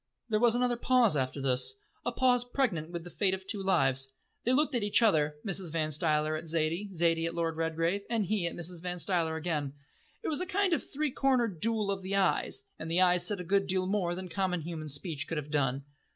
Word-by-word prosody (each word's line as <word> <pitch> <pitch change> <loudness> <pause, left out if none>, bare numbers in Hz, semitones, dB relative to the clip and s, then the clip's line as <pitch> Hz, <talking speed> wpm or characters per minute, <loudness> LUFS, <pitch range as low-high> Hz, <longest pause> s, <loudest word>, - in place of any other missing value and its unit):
There 215 -1 +2
was 235 0 +4
another 245 -1 +1
pause 240 -7 +4
after 130 0 -1
this, 135 - 0 0.3
a - - -1
pause 250 -1 +3
pregnant 240 - -1
with 170 -1 -5
the 175 - -10
fate 190 -2 +1
of 190 0 -11
two 200 0 -2
lives. 135 -8 +2 0.3
They 245 - +2
looked 295 +3 +2
at 240 - +1
each 205 +3 +3
other 155 -8 +3
Mrs. 190 -4 -2
Van 155 -1 -1
Stuyler 155 0 +1
at 155 +2 -5
Zaidie, 165 +5 -1
Zaidie 165 -2 +1
at 170 - -5
Lord 165 -1 -1
Redgrave, 165 +4 0
and 225 -3 +1
he 190 -2 0
at - - -5
Mrs. 175 0 -4
Van 180 0 -4
Stuyler 170 -3 0
again. 150 -4 -2 0.5
It - - -3
was 315 +2 +1
a 365 - -2
kind 390 0 +2
of 315 - 0
three 295 0 -1
cornered 245 - +1
duel 215 0 0
of 195 -1 -3
eyes, 195 - +1 0.2
and - - -5
the 170 +2 +2
eyes 180 -1 +4
said 205 -3 -2
a - - -4
good 195 +2 +1
deal 185 0 0
more 185 -3 0
than 185 0 -6
common 180 0 -1
human 155 -1 -5
speech 150 +2 -4
could 165 - -3
have 150 0 -5
done. 135 -2 +1
180 Hz, 225 wpm, -30 LUFS, 160-215 Hz, 0.5 s, was